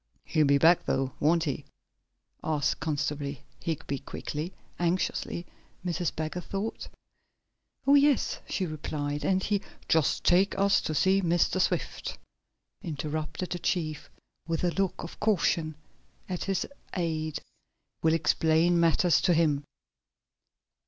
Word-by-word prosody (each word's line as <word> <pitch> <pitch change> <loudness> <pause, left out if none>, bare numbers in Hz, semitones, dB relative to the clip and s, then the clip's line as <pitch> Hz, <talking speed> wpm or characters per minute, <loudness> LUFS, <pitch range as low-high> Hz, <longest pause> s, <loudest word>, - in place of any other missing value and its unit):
"He'll 155 -2 +2
be 140 0 +5
back 165 +4 +5
though, 135 0 +1
won't 165 +2 +3
he?" 145 -5 -2 0.8
asked 150 -3 0
Constable 145 -2 -2 0.2
Higby 145 -4 -3
quickly 155 +4 -5 0.3
anxiously, 175 0 -1 0.4
Mrs. 175 -1 0
Baggert 160 +3 -3
thought. 200 +3 -4 1.0
"Oh, 280 - +5
yes," 285 -2 +4
she 190 - 0
replied. 145 -2 -3
"He - - -1 0.3
and - - -9
" - - -27
"Just 160 -3 +2
take 185 +3 +4
us 200 -1 +4
to 155 - -2
see 190 +5 +4
Mr. 175 +1 +2
Swift," - - -1 0.6
interrupted 155 +1 -4
the 175 - -2
chief, 155 -6 -2 0.4
with 165 0 -1
a 175 - +3
look 195 -2 -1
of 170 - -9
caution 165 -6 +1 0.5
at 180 -2 -3
his 195 -2 0 0.3
aide. 160 -3 -1 0.6
"We'll 160 0 +4
explain 165 +2 +3
matters 170 +1 +4
to 175 -3 +3
him." 150 -3 +2
165 Hz, 125 wpm, -29 LUFS, 155-180 Hz, 1.0 s, be